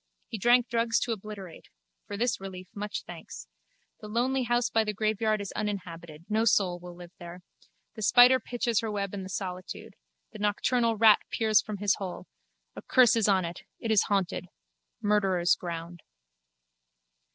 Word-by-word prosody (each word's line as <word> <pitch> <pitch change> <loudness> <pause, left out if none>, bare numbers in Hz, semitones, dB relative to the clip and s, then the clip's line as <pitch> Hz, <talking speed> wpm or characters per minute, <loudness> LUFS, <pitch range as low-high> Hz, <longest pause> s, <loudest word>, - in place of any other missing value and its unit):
He 220 - -6
drank 240 +3 +4
drugs 230 -1 +1
to 240 - -1
obliterate. 205 -5 -8 0.4
For 205 - -5
this 230 -2 0
relief 185 -1 -8
much 205 0 -5
thanks. 170 - -10 0.5
The 210 - -9
lonely 250 +5 0
house 240 0 +1
by 225 - +2
the 210 -1 -3
graveyard 215 0 0
is 200 - -6
uninhabited. 170 -6 -5
No 220 +1 +1
soul 190 -5 +2
will 175 0 -10
live 175 -1 -12
there. 175 0 -10 0.5
The 220 - -9
spider 245 +4 +6
pitches 240 -3 -1
her 225 - -3
web 200 -2 -3
in 200 - -4
the 190 - -8
solitude. 185 -1 -6 0.4
The - - -10
nocturnal 225 +3 +1
rat 220 -1 +7
peers 220 -2 +3
from 210 -1 -6
his 205 0 +2
hole. 185 -2 -6 0.5
A - - -7
curse 250 -3 +4
is 225 -2 +2
on 190 -3 +3
it. 170 +1 -7 0.2
It 225 - -3
is 210 -3 +4
haunted. 190 -3 -1 0.6
Murderer's 195 -4 +2
ground. 170 -1 -7
205 Hz, 165 wpm, -28 LUFS, 185-225 Hz, 0.6 s, rat